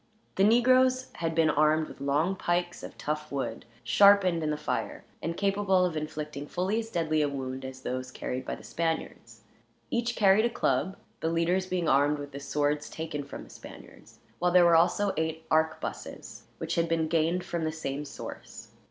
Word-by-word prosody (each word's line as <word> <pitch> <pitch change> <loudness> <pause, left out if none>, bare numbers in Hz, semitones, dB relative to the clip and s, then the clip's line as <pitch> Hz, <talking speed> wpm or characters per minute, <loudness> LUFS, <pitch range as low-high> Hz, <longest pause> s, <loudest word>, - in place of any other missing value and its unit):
The 195 - +2
negroes 255 +3 +4
had 165 -1 -2
been 160 -2 +4
armed 155 +1 +3
with - - -12
long 150 +7 +1
pikes 175 -1 -1
of - - -9
tough 150 0 -3
wood, 140 -1 -3 0.2
sharpened 200 -4 +5
in 155 - -1
the 150 - -1
fire, - - -3 0.2
and 170 +2 -3
capable 195 -2 +2
of 175 -3 -2
inflicting 150 -2 -5
fully 190 +8 -1
as 225 0 -5
deadly 160 -5 0
a 145 - +1
wound 135 -1 -5
as 130 0 -8
those 130 0 -4
carried 130 0 -4
by - - -4
the - - -14
Spaniards. 165 -1 -4 0.5
Each 240 0 0
carried 205 +2 +5
a - - +2
club, 185 - 0 0.2
the 160 - -1
leaders 170 +3 +1
being 180 -3 -1
armed 145 +2 +3
with 145 0 -7
the 140 - -7
swords 145 +1 -1
taken 160 -2 -5
from 140 - -9
the - - -15
Spaniards; - - -13 0.2
while 180 - +2
there 180 -1 +6
were 170 -1 +6
also 190 +4 +3
eight 160 0 -2
arquebuses, 160 0 -2
which - - -3
had 170 0 +1
been 165 -1 +1
gained 165 +2 +1
from 170 -1 -3
the 160 - 0
same 150 -3 -4
source. 145 - -9
160 Hz, 185 wpm, -28 LUFS, 150-185 Hz, 0.5 s, there